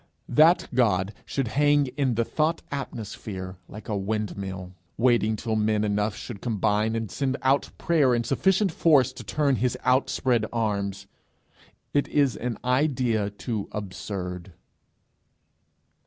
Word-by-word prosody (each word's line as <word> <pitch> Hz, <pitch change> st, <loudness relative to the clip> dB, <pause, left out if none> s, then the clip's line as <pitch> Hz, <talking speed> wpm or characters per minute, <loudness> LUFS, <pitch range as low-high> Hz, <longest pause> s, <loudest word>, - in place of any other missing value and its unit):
That 160 Hz, +4 st, +5 dB
God 105 Hz, -5 st, +2 dB
should 135 Hz, -5 st, -1 dB
hang 145 Hz, +2 st, +3 dB
in 135 Hz, -5 st, +1 dB
the 115 Hz, +1 st, +1 dB
thought 160 Hz, +5 st, 0 dB
atmosphere 105 Hz, -8 st, -6 dB
like 105 Hz, -, -10 dB
a 105 Hz, -, -1 dB
windmill, 95 Hz, -2 st, -3 dB, 0.2 s
waiting 115 Hz, -2 st, +3 dB
till 110 Hz, +1 st, -2 dB
men 105 Hz, 0 st, +1 dB
enough 105 Hz, -1 st, 0 dB
should 100 Hz, -, -8 dB
combine 110 Hz, -1 st, +1 dB
and 115 Hz, -3 st, -3 dB
send 135 Hz, -1 st, -1 dB
out 135 Hz, +1 st, +2 dB
prayer 145 Hz, -7 st, +3 dB
in 120 Hz, -, 0 dB
sufficient 190 Hz, -, +2 dB
force 140 Hz, -6 st, +4 dB
to -, -, -9 dB
turn 140 Hz, -4 st, +1 dB
his 125 Hz, +1 st, 0 dB
outspread 125 Hz, -3 st, +2 dB
arms, 100 Hz, -4 st, -2 dB, 0.9 s
is 145 Hz, -2 st, +2 dB
an 120 Hz, -1 st, -3 dB
idea 125 Hz, -5 st, +1 dB
too 105 Hz, 0 st, -4 dB
absurd. 95 Hz, -2 st, -5 dB
115 Hz, 125 wpm, -26 LUFS, 105-135 Hz, 0.9 s, That